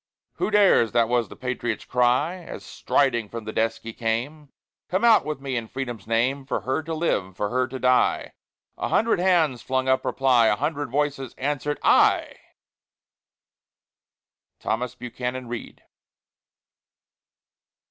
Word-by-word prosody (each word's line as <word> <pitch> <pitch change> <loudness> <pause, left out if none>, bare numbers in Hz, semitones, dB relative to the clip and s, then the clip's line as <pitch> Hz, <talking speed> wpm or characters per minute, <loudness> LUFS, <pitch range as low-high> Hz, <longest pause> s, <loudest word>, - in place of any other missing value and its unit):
"Who - - 0
dares" 200 - +4
this 115 -1 +4
was 120 -2 0
the - - -10
patriot's 125 -3 -3
cry, 125 +8 +1
As 175 - -9
striding 120 -6 0
from 115 0 -6
the 110 - -5
desk 115 0 -1
he 115 - -7
came 125 +7 -3 0.4
"Come 185 +4 0
out 230 -2 +6
with 150 -2 -4
me, 135 -1 -4
in 115 -2 -3
Freedom's 120 -5 -6
name, 125 +5 +1
For 130 - -3
her 130 +5 -1
to 160 +1 -5
live, 95 - -1
for 105 - -1
her 130 0 +1
to 130 - -6
die?" 125 0 +2 0.5
A - - -1
hundred 225 -4 +2
hands 165 -9 +2
flung 130 0 -1
up 130 0 +2
reply, 125 -4 +3
A 105 - +3
hundred 145 +4 -2
voices 140 -1 -2
answer'd, 145 +2 -2
"I!" - - +4 2.2
THOMAS 125 +2 -2
BUCHANAN 125 +1 -5
READ. 120 -1 -7
130 Hz, 145 wpm, -24 LUFS, 115-145 Hz, 2.2 s, out